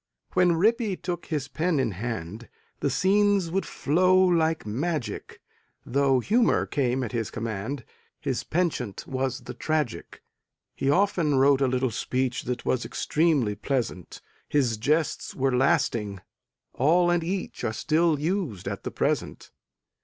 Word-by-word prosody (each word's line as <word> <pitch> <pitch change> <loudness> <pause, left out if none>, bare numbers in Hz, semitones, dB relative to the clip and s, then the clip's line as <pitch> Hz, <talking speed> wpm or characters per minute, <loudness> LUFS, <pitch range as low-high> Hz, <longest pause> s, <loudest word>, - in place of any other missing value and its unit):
When 180 -1 +4
Rippy 215 +3 +2
took 175 -2 -4
his 150 -5 -2
pen 160 +2 0
in 125 -4 +1
hand 110 +1 -5 0.3
The 140 - 0
scenes 195 +3 +2
would 195 +2 -1
flow 185 +5 +2
like 165 -3 +3
magic; 140 +6 -3 0.5
Though 135 0 +2
humor 230 - +2
came 130 -2 0
at 115 - -4
his 115 -2 -2
command 110 +3 -4 0.3
His - - -2
penchant 155 - -2
was 130 0 -2
the 120 - -8
tragic; 150 - -3 0.5
He 135 - -1
often 170 -3 +2
wrote 135 +1 +4
a 135 - +4
little 130 -1 0
speech 130 +3 -2
That 125 0 -3
was 130 - +1
extremely 150 -9 +1
pleasant 110 -5 -3 0.3
His 125 -6 +1
jests 150 +8 0
were 130 -1 +1
lasting 105 -6 +1 0.5
all 175 +6 +3
and 175 -1 +1
each 185 +2 -4
Are - - 0
still 155 +6 +1
used 155 - -2
at - - -4
the - - -3
present. - - -2
140 Hz, 140 wpm, -26 LUFS, 120-170 Hz, 0.5 s, When